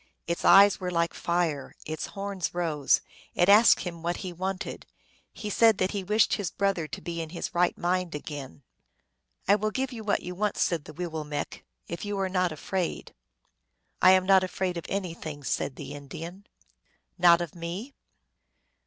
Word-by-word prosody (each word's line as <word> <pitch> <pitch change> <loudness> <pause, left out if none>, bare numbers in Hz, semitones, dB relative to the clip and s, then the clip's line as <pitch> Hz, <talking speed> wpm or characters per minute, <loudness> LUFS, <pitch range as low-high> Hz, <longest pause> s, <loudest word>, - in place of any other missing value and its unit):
Its 170 0 -2
eyes 200 +2 +7
were 180 - -3
like 170 -1 0
fire; 170 -5 -1
its 155 0 -4
horns 195 -4 -3
rose. 155 -5 +2 0.3
It 175 - +3
asked 215 +3 +7
him 170 -2 -6
what 170 +1 -1
he 180 - -5
wanted. 190 +2 -4 0.4
He 210 -2 -6
said 225 0 +5
that 185 0 0
he 200 -2 -3
wished 210 +4 +3
his 200 -5 -1
brother 195 -5 0
to - - -7
be 170 -1 -4
in 160 - -6
his 170 - -5
right 175 0 +2
mind 180 -1 -1
again. 145 -2 -7 0.4
" - - -39
I 200 - +6
will 215 +1 +1
give 265 +4 -2
you 230 -3 -7
what 205 -1 0
you 180 - -5
want," 205 +3 -1
said 165 -4 0
the 155 - -10
Wee 175 +4 -4
willmekq, 155 -3 -4
" - - -45
if 170 0 -5
you 205 -1 -3
are 190 -1 0
not 185 -2 +1
afraid." 175 +3 -3 0.4
" - - -46
I 185 - +8
am 185 0 +3
not 190 -1 +5
afraid 185 -1 -2
of 170 - -6
anything," 165 -6 -4
said 130 0 -2
the - - -7
Indian. 165 +7 -9 0.4
" - - -41
Not 170 -1 +7
of 175 -3 -4
me 180 +10 -6
175 Hz, 190 wpm, -27 LUFS, 165-195 Hz, 0.4 s, I